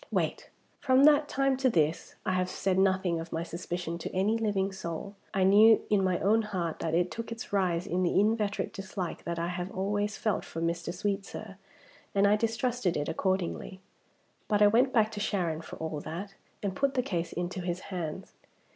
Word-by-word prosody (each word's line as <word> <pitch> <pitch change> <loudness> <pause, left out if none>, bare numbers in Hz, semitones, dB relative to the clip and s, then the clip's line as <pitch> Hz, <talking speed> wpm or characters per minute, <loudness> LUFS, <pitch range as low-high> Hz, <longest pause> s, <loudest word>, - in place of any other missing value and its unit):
Wait! - - -1 0.3
From 260 0 +4
that 295 0 +6
time 275 -1 +2
to 265 0 +3
this 160 -6 0
I - - +1
have 185 0 0
said 190 0 0
nothing 190 -3 +2
of 165 - -7
my 165 - -2
suspicion 170 0 -4
to - - -5
any 200 +4 +2
living 205 -3 0
soul. 190 +1 -5 0.2
I 195 - +1
knew 210 +4 +6
in 200 -2 +4
my 185 -2 +2
own 215 +4 +4
heart 185 -6 -3
that 160 0 -1
it 175 +1 +1
took 230 0 -6
its 230 -2 -7
rise 180 -3 +1
in 180 +2 -1
the 180 +1 +2
inveterate 210 -1 +1
dislike 190 -3 -5
that 170 0 -3
I 170 +1 -1
have 180 0 -3
always 205 +2 -1
felt 215 - 0
for 165 - -7
Mr. 170 0 -1
Sweetsir, 200 +1 -4 0.6
and 200 0 +4
I 205 +1 +5
distrusted 230 -2 0
it 145 +1 -2
accordingly. 190 +2 -2 0.7
But 210 -1 +3
I - - +8
went 250 +5 +4
back 220 -3 +3
to 210 - -5
Sharon, 175 -6 -1
for - - -9
all 160 -2 -4
that, 190 +7 -6 0.3
and 195 -2 -2
put 275 +3 +1
the 250 - +2
case 175 -8 -2
into 180 +1 -3
his 175 0 -2
hands. 175 +1 -5
190 Hz, 195 wpm, -29 LUFS, 175-215 Hz, 0.7 s, I